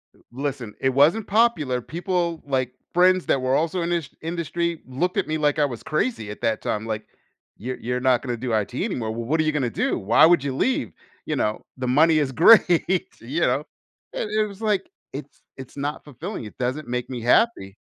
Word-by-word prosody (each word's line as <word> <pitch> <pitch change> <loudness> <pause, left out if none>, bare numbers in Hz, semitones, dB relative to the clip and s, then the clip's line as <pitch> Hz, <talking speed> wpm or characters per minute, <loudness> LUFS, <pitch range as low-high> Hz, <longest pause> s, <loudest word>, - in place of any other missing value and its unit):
L - - -25
listen, 130 -4 -4
it 130 - +2
wasn't 150 +11 +3
popular. 185 - +2
People 170 +2 -2
like, 130 -3 -1 0.2
friends 185 +1 +4
that 135 - +2
were 130 +1 +1
also 165 +4 0
in 170 - -2
this 170 -5 -1
industry 170 0 -2
looked 160 +8 -1
at - - +1
me 155 - -1
like 150 -1 +1
I 150 - +4
was 120 -5 -6
crazy 155 - -1
at 105 - -10
that 110 -1 0
time, 110 +1 -2
like, 110 -1 -3 0.5
"You're 125 +4 -5
you're 125 +2 -2
not 125 -1 +2
gonna 125 -3 -2
do 125 +1 -4
IT 110 +2 0
anymore, 120 - -2
well, 115 +1 -4
what 155 +7 0
are - - +4
you 155 - +1
gonna 140 -5 0
do? - - -1
Why 105 +9 +5
would 170 -3 +4
you 135 -2 -2
leave?" 195 - 0 0.3
You - - -2
know, 105 0 -1 0.2
the 130 -1 -3
money 155 +5 +4
is 145 -3 +1
great, 180 - +5
you 140 +9 -3
know, 135 -1 +2 0.5
and 210 - -3
it 215 0 +1
was 200 0 -12
like, 210 -3 0 0.2
"It's 140 +1 -9 0.2
it's 130 +1 -11
not 145 +1 -3
fulfilling, 135 -4 -7
it 105 - -11
doesn't 130 +5 -2
make 125 0 -3
me 125 -2 -5
happy." 120 - +2
145 Hz, 210 wpm, -23 LUFS, 125-170 Hz, 0.5 s, Why